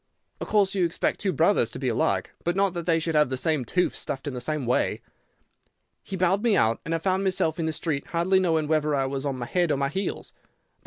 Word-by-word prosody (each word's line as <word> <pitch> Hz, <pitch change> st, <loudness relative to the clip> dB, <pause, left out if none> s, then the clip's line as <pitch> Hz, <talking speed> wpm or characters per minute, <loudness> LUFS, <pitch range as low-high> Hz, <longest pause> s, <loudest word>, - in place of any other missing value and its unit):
Of -, -, -5 dB
course 205 Hz, -3 st, +2 dB
you 190 Hz, -2 st, +1 dB
expect 170 Hz, -1 st, -1 dB
two 195 Hz, -, 0 dB
brothers 160 Hz, -, +3 dB
to 125 Hz, -, -7 dB
be 130 Hz, 0 st, -3 dB
alike, 100 Hz, -5 st, 0 dB
but 175 Hz, +1 st, 0 dB
not 195 Hz, -2 st, +2 dB
that 170 Hz, -1 st, -5 dB
they 165 Hz, -1 st, +3 dB
should 165 Hz, 0 st, -1 dB
have 150 Hz, -3 st, +3 dB
the 130 Hz, -, -2 dB
same 155 Hz, -1 st, +1 dB
tooth 180 Hz, +10 st, 0 dB
stuffed 135 Hz, +1 st, -4 dB
in 145 Hz, -, -3 dB
the 125 Hz, -, -5 dB
same 150 Hz, +1 st, -2 dB
way. 125 Hz, -, +1 dB, 1.0 s
He 195 Hz, -, -6 dB
bowed 185 Hz, +2 st, +2 dB
me 230 Hz, -3 st, +3 dB
out, 110 Hz, +1 st, +2 dB
and 165 Hz, +1 st, -2 dB
I -, -, +1 dB
found 185 Hz, +3 st, 0 dB
myself 175 Hz, -4 st, 0 dB
in 160 Hz, -, 0 dB
the -, -, 0 dB
street, 150 Hz, -2 st, -2 dB
hardly 175 Hz, +3 st, +2 dB
knowing 160 Hz, -4 st, +1 dB
whether 150 Hz, -1 st, +1 dB
I 135 Hz, -1 st, +1 dB
was 135 Hz, +1 st, -3 dB
on 135 Hz, -, -2 dB
my 120 Hz, -, -4 dB
head 175 Hz, +6 st, 0 dB
or 145 Hz, -, +1 dB
my 140 Hz, 0 st, 0 dB
heels. 195 Hz, +7 st, -4 dB
160 Hz, 250 wpm, -25 LUFS, 140-185 Hz, 1.0 s, brothers